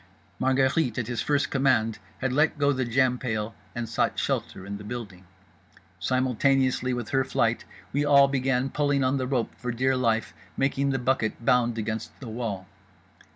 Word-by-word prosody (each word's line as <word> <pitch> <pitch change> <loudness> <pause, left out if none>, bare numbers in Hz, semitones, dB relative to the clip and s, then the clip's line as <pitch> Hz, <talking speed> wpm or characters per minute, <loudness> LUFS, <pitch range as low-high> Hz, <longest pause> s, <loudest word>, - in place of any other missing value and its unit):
Margherite, 130 0 +2
at 125 - -1
his 120 -1 -2
first 145 -1 +1
command, 125 -5 +2 0.2
had 130 -1 0
let 150 +3 +2
go 145 0 +3
the 130 -1 -1
jam 125 +1 +2
pail 110 -3 -2 0.2
and 120 -1 -3
sought 110 - 0
shelter 95 - -2
in 100 +1 -6
the - - -9
building. 105 -5 -7 0.7
Simultaneously 130 0 +1
with 120 -3 -3
her 135 -1 +2
flight - - 0 0.3
we 145 +2 +1
all 140 -1 +6
began 135 -1 0
pulling 145 -2 +1
on 130 +2 +2
the 130 -1 -2
rope 125 -4 -1
for 125 -1 -3
dear 130 +3 +1
life, 115 -3 0 0.2
making 135 0 +1
the 135 - +1
bucket 125 -3 -1
bound 120 -1 +3
against 110 0 -4
the 125 - -8
wall. 110 -5 -4
125 Hz, 170 wpm, -26 LUFS, 115-135 Hz, 0.7 s, all